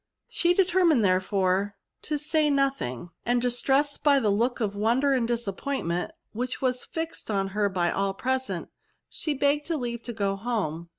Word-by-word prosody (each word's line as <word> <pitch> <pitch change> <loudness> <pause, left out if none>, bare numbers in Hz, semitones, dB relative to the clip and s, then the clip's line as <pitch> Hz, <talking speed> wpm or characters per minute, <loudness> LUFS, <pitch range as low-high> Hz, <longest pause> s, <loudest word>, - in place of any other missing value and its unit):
She 350 0 +2
determined, 350 - +4
therefore, 190 +1 +1 0.3
to 300 - -2
say 300 +1 +2
nothing; 270 - -1
and, 245 +1 +2
distressed 270 +4 +1
by 285 -2 +5
the 215 -5 +2
look 235 +5 +1
of 205 -3 -1
won 225 +5 +2
der 280 0 +3
and 245 -3 +1
disappointment 230 - -2 0.2
which 250 +3 -3
was 255 -1 0
fixed 325 -6 -5
on 195 -2 0
her 205 +1 +1
by 175 -2 0
all 195 0 -1
present, 260 +4 -2 0.4
she 305 -3 -3
begged 285 +3 +1
leave 240 -7 -2
to 240 - -6
go 200 -3 0
home. 195 -7 -3
240 Hz, 165 wpm, -27 LUFS, 200-280 Hz, 0.4 s, by